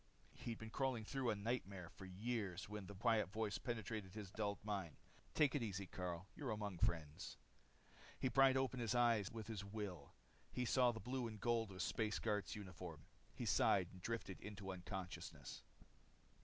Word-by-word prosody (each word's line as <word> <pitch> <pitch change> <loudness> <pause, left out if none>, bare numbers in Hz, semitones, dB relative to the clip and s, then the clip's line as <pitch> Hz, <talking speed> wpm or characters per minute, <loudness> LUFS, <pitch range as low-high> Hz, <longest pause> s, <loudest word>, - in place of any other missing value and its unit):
He'd 115 -2 -4
been 110 0 -7
crawling 130 -3 +1
through 130 +1 0
a 110 - +3
nightmare 100 -4 -2
for 95 - -10
years 100 -1 -2
when 105 -2 -5
the 100 - -7
quiet 110 0 +3
voice 110 -1 0
penetrated 110 -5 -3
his 105 -4 -5
dulled 100 -1 0
mind. 95 -7 -2 0.4
"Take 150 -3 +6
it 145 - +2
easy, 100 -3 -1
Karyl. 90 -1 -3
You're 140 - -3
among 105 -5 -2
friends." 80 -3 0 0.8
He - - +2
pried 135 +2 +7
open 130 -1 +1
his 120 0 +1
eyes 115 -5 +5
with 110 -2 -4
his 110 -2 -3
will. 100 -7 -5 0.4
He 125 - 0
saw 125 0 +6
the 110 - -5
blue 125 +1 -1
and 110 -2 -6
gold 115 -1 +2
of 95 - -8
a - - -1
space 105 +3 +1
guard's 105 0 0
uniform. 90 -6 -7 0.3
He - - -2
sighed 95 -3 +5
and 95 - -11
drifted 110 -3 -2
into 100 -2 -5
unconsciousness. 95 0 -5
105 Hz, 175 wpm, -43 LUFS, 95-115 Hz, 0.8 s, pried